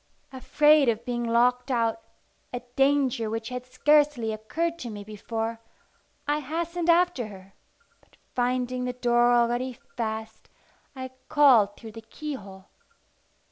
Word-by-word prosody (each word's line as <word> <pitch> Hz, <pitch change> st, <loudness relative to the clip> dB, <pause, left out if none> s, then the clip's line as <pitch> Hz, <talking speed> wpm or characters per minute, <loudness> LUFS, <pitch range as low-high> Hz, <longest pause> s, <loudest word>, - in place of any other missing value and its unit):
Afraid 295 Hz, +1 st, +4 dB
of 230 Hz, 0 st, -2 dB
being 240 Hz, -1 st, -2 dB
locked 245 Hz, +2 st, +2 dB
out, 230 Hz, -3 st, 0 dB, 0.5 s
a 245 Hz, -, -4 dB
danger 270 Hz, -5 st, +2 dB
which 225 Hz, +1 st, -4 dB
had 250 Hz, 0 st, -6 dB
scarcely 290 Hz, -5 st, +2 dB
occurred 330 Hz, +11 st, -3 dB
to 245 Hz, -, -6 dB
me 205 Hz, -2 st, -7 dB
before, 225 Hz, +2 st, -5 dB, 0.7 s
I 295 Hz, +1 st, +1 dB
hastened 335 Hz, +4 st, -3 dB
after 340 Hz, -8 st, +3 dB
her; 195 Hz, -1 st, -13 dB, 0.5 s
but -, -, -28 dB, 0.2 s
finding 250 Hz, 0 st, -1 dB
the 250 Hz, -, -2 dB
door 240 Hz, -1 st, +3 dB
already 240 Hz, +2 st, +1 dB, 0.2 s
fast, 220 Hz, -1 st, -5 dB, 0.5 s
I 260 Hz, -1 st, -6 dB, 0.2 s
called 245 Hz, -9 st, +5 dB
through 225 Hz, -, -10 dB
the 225 Hz, +1 st, -10 dB
keyhole. 220 Hz, -6 st, -8 dB
245 Hz, 130 wpm, -26 LUFS, 225-275 Hz, 0.7 s, called